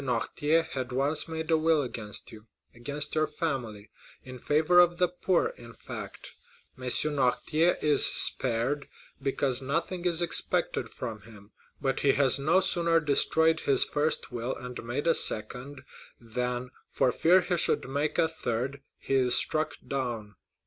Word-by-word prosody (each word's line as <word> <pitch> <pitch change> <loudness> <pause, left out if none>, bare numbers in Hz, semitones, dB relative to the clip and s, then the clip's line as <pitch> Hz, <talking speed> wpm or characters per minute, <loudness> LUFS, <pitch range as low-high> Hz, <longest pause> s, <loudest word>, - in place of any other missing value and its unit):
Noirtier 145 +6 0
had 130 -1 -4
once 140 +4 0
made 160 0 -5
a 160 - +4
will 160 -2 +2
against 110 -4 -5
you—against 120 +6 -5
your 155 0 +1
family—in 125 -3 -7
favor 155 +6 +3
of 175 -1 +4
the 180 0 +3
poor, 180 - 0
in - - -13
fact; - - -9 0.4
M. 130 -3 -10
Noirtier 145 +5 +1
is 150 -1 +5
spared, 130 +4 +1 0.3
because 135 -1 0
nothing 165 +6 -3
is 170 -2 +2
expected 175 -1 +1
from 115 -4 -7
him. 105 -2 -16 0.3
But 135 -2 -1
he 140 -1 +3
has 135 -1 +3
no 165 +7 +3
sooner 170 -3 +1
destroyed 160 +2 +2
his 140 -4 +3
first 150 0 -2
will 120 +1 -4
and 125 -1 -8
made 120 +6 -4
a 165 - +4
second, 125 +5 0 0.4
than, 125 +2 -3 0.2
for 125 - +1
fear 180 +7 +4
he 180 0 -1
should - - +3
make 145 +3 -2
a 165 - +3
third, 135 -3 -4 0.2
he - - -5
is 125 -2 +5
struck 155 0 0
down. 120 -6 -4
140 Hz, 150 wpm, -28 LUFS, 125-160 Hz, 0.4 s, is